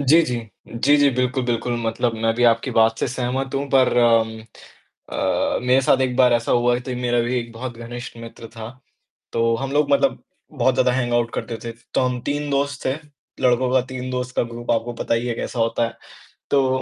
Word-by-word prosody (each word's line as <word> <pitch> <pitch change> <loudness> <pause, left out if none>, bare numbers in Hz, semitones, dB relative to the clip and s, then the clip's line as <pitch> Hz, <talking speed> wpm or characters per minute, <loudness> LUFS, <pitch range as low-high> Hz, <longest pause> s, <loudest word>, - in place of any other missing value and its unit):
जी, 145 +4 +5
जी। 125 -5 -2 0.3
जी, 135 +6 +3
जी, 145 -1 +5
बिल्कुल, 125 0 0
बिल्कुल 120 0 -1
मतलब 115 +1 0
मैं 115 0 +1
भी 120 +1 +1
आपकी 115 -1 +3
बात 115 0 +3
से - - 0
सहमत 130 +2 -2
हूँ 140 +1 -1
पर 130 -2 +4
अम, 115 -2 +3 0.7
अ, - - 0
मेरे 130 +1 +4
साथ 130 +1 +3
एक 125 -1 0
बार 125 -2 +5
ऐसा 115 0 +1
हुआ 120 0 +3
थी, 125 - -3
मेरा 120 -1 +1
भी 120 +2 -1
एक 115 -1 -7
बहुत 120 0 -7
घनिष्ठ 120 0 -8
मित्र 115 0 -10
था। 110 0 -7 0.6
तो 115 0 +2
हम 135 +2 -4
लोग 145 0 +2
मतलब 140 - +2 0.3
बहुत - - +2
ज़्यादा 125 - +3
हैंगऑउट 120 -2 0
करते 115 - -4
थे। 115 - -3 0.2
तो - - +2
हम 125 -1 0
3 145 0 -2
दोस्त 140 0 -1
थे, 130 - +2 0.5
लड़कों 125 0 +3
का 130 - +4
3 130 0 -5
दोस्त 125 0 -4
का - - +2
ग्रुप 120 0 -5
आपको 115 +1 0
पता - - 0
ही 120 +2 -2
है 115 - -2
कैसा 120 - -4
होता 115 +1 +1
है। 115 - -11 0.5
तो 130 -2 +2
120 Hz, 210 wpm, -22 LUFS, 115-130 Hz, 0.7 s, जी